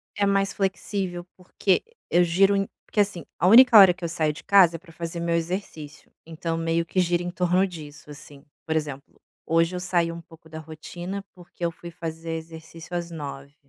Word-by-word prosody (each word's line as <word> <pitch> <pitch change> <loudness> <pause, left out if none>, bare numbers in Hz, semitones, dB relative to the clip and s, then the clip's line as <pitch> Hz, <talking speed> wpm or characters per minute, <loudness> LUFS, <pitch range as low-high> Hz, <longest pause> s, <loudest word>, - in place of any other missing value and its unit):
É 205 - +1
mais 195 0 +1
flexível 190 -2 -3
porque 185 +1 0 0.3
e - - +3
eu 175 - +6
giro 195 +4 +3
em 195 0 0 0.2
que - - -1
assim, 200 -4 +1
a 180 - +2
única 240 +3 +8
hora 190 -3 +9
que 180 0 -15
eu 170 - -2
saio 160 -2 0
de - - -12
casa 185 -4 +5
é - - -19
pra 170 0 -17
fazer 165 +1 -6
meu 170 0 0
exercício, 165 -3 -5
então, 165 0 -4
meio 165 0 0
que 170 +3 -2
gira 175 -1 +1
em 175 - -4
torno 180 +1 +1
disso, 150 -4 -11
assim. 140 -1 -12 0.2
Por 160 - -2
exemplo: 145 -3 -5 0.2
hoje 165 +2 +1
eu - - -3
saí 175 -2 0
um 170 0 -8
pouco 165 0 -18
da 160 0 -8
rotina, 175 +5 -7
porque 175 -1 -13
eu 170 - 0
fui 170 +1 -11
fazer 165 -1 -6
exercício 160 +1 -10
às 170 -1 -4
9h. 140 -3 -8
170 Hz, 205 wpm, -25 LUFS, 160-185 Hz, 0.3 s, hora